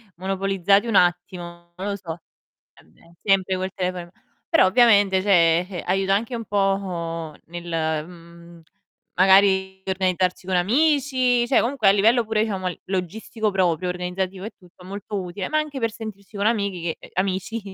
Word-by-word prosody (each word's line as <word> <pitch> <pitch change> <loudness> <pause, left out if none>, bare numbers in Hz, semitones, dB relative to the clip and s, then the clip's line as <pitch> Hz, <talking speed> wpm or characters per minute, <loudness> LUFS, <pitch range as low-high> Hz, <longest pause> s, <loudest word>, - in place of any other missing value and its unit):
monopolizzati 195 +2 +1
un 225 - -1
attimo, 175 -1 0
non 190 +2 -4
lo 200 - -2
so. 175 -3 -7 0.5
E - - -21
beh, 165 - -23
sempre 195 -2 +2
quel 185 +1 -3
telefono 180 -1 -3
in - - -18
m - - -22 0.4
però 330 - +5
ovviamente, 200 -3 +4
cioè, 170 -4 +4
eh, 180 -4 -6
aiuta 195 +1 +1
anche 225 +5 -2
un 230 -1 -5
po' 180 -6 -2
nel, 165 -2 -3
mhmm, 170 -1 -15 0.5
magari 190 0 +4
per 190 - -1
organizzarci 185 -1 -1
con 190 - 0
amici, 255 - +2
cioè 260 - +4
comunque 245 -4 0
a - - +8
livello 225 +5 +3
pure 215 0 0
diciamo 195 -4 -3
l 180 - -8
logistico 205 +4 -3
proprio, 180 -2 0
organizzativo 180 +1 -4
e 220 - -6
tutto, 180 0 -19
molto 200 +1 -5
utile, 185 +1 -5
ma 310 - +1
anche 305 -3 -2
per 230 -2 -1
sentirsi 215 -2 -10
con 200 - -1
amiche 195 -7 -1
che - - -14
amici, 190 +4 -2
190 Hz, 170 wpm, -23 LUFS, 180-205 Hz, 0.5 s, a